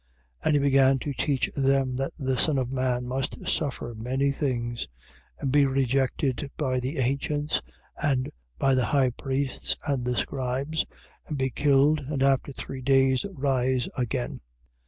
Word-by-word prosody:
8:31. - - -19
And - - +4
he - - +4
began 135 -1 +4
to 140 +2 -4
teach 135 0 0
them 135 -2 +2
that 135 +1 -1
the 135 -4 0
Son 140 +4 +2
of 130 -1 -1
man 130 -2 0
must 130 +2 -3
suffer 130 -5 -1
many 130 +5 0
things 120 -4 -2 0.5
and 135 - -1
be 145 0 +5
rejected 135 +1 0
by 130 -4 0
the 130 +5 -3
ancients 140 +3 0 0.4
and 135 -4 +1 0.3
by 135 - +3
the 130 -2 +3
high 135 -3 +2
priests 135 +1 -1
and 140 -5 0
the 125 0 -1
scribes: 135 +4 -1 0.4
and 150 - -3
be 130 -1 0
killed 145 +3 +4
and 140 -2 0
after 135 0 +2
three 135 0 -7
days 135 +3 +3
rise 130 -2 +1
again. 115 - -2
135 Hz, 155 wpm, -27 LUFS, 130-140 Hz, 0.5 s, be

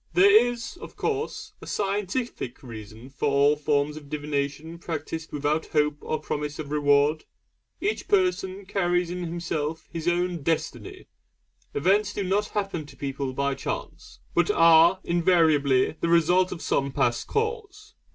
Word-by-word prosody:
There 200 +6 +6
is, 240 +5 -5
of - - -11
course, 435 0 -3
a - - -10
scientific 200 - -3
reason 110 +1 -10
for 145 +1 -1
all 140 +1 +4
forms 150 0 0
of 145 -2 -11
divination 150 +2 -3
practised 160 -1 -5
without 150 +2 -1
hope 150 -1 +1
or 155 - -2
promise 150 0 -4
of 145 -2 -6
reward. 145 +1 +3 0.5
Each 420 +2 -2
person 360 - +1
carries 175 -2 0
in 180 - -4
himself 165 -2 -3
his 165 0 -4
own 175 -1 0
Destiny. 165 +3 -3 0.7
Events 200 +7 +2
do 200 - -2
not 200 +3 0
happen 195 -7 -3
to - - -15
people 135 -1 -3
by 140 +1 0
chance, - - -6 0.2
but 175 +1 +2
are 165 -1 +6
invariably 160 -6 +3
the 170 - +1
result 175 +2 +4
of 170 - -6
some 140 0 0
past 120 -2 0
cause. 435 -1 -3
165 Hz, 145 wpm, -26 LUFS, 145-195 Hz, 0.7 s, There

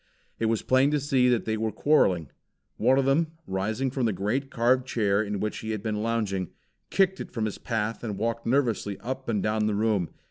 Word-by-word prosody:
It 115 - +1
was 110 -1 0
plain 130 +2 +4
to 150 0 +1
see 130 -3 +2
that 120 -2 +1
they 110 0 -1
were 110 0 -1
quarreling. 95 - +2 0.5
One 130 +4 +4
of 135 - +2
them, 155 +4 +2
rising 110 +7 -1
from 130 -3 0
the - - +1
great 115 +9 -1
carved 125 +1 +2
chair 100 -4 +1
in 105 -2 -3
which 105 +1 -2
he 110 - -6
had 105 -2 -5
been 105 -2 -2
lounging, 105 -5 -1 0.4
kicked 190 -1 +2
it - - -6
from 115 -3 -2
his 105 - -4
path 115 -1 -2
and 105 -4 -3
walked 115 0 -2
nervously 115 -6 0
up 130 +3 -5
and 105 -4 0
down 105 0 +1
the 105 - 0
room. 105 -4 +1
115 Hz, 215 wpm, -27 LUFS, 105-130 Hz, 0.5 s, plain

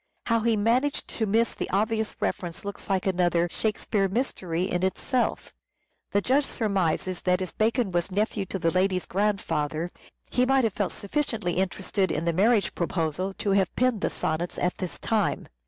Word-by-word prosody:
How 230 -1 +3
he 225 0 +2
managed 245 +7 +1
to 220 - -2
miss 225 +3 +2
the - - -4
obvious 220 +2 0
inference 175 +1 -3
looks 200 0 -6
like 190 -1 +1
another 175 -2 +2
"Shakespeare 210 -2 0
mystery" 185 -6 -1
in 180 -2 -1
itself. 235 +6 -1 0.6
The 205 - +2
Judge 270 +7 +3
surmises 185 -4 0
that 180 0 +2
as 185 -2 -3
Bacon 225 -1 +1
was 175 0 0
nephew 205 0 0
to 195 - -3
the 165 -2 +1
lady's 185 0 +1
grandfather, 170 -5 -1 0.4
he 250 - +3
might 270 0 +4
have 225 -4 +1
felt 200 -1 -1
sufficiently 215 - -2
interested 190 0 0
in 165 - -1
the 170 - +2
marriage 205 +1 +3
proposal 170 +2 -1
to 200 - -1
have 195 -2 +2
penned 250 -5 +2
the - - +1
Sonnets 160 +2 -2
at 180 - 0
this 185 -2 -4
time. 215 -3 0
195 Hz, 170 wpm, -26 LUFS, 180-220 Hz, 0.6 s, might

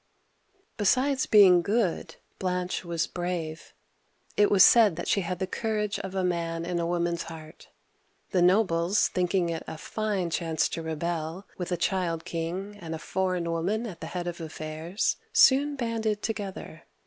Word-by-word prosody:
Besides 260 +6 +2
being 190 -4 +7
good, 205 -1 -1 0.2
Blanche 180 0 -2
was 170 -2 -1
brave; 175 -3 -4 0.6
it 205 0 +4
was 195 -2 +7
said 220 -7 +6
that - - -5
she 200 - +2
had 180 0 -3
the 190 - -1
courage 210 +1 -2
of 190 0 -6
a 190 - 0
man 170 -2 -1
in 175 0 -2
a 170 - -1
woman's 170 -1 -1
heart. 160 -1 -10 0.6
The 185 - +2
nobles, 180 0 +3
thinking 180 -1 0
it 165 -1 -3
a - - -6
fine 195 -1 -2
chance 160 -2 0
to 165 - -4
rebel, 160 +3 -3
with 180 0 -4
a 175 - 0
child 170 -3 -1
king 180 +5 -4
and 165 -1 -5
a - - -4
foreign 185 0 -2
woman 195 +8 -1
at 190 -7 -8
the - - -5
head 180 -1 -4
of 175 -1 -5
affairs, 160 +3 -3 0.2
soon 285 +2 +5
banded 225 -4 -2
together. 195 -6 -5
180 Hz, 160 wpm, -27 LUFS, 165-205 Hz, 0.6 s, being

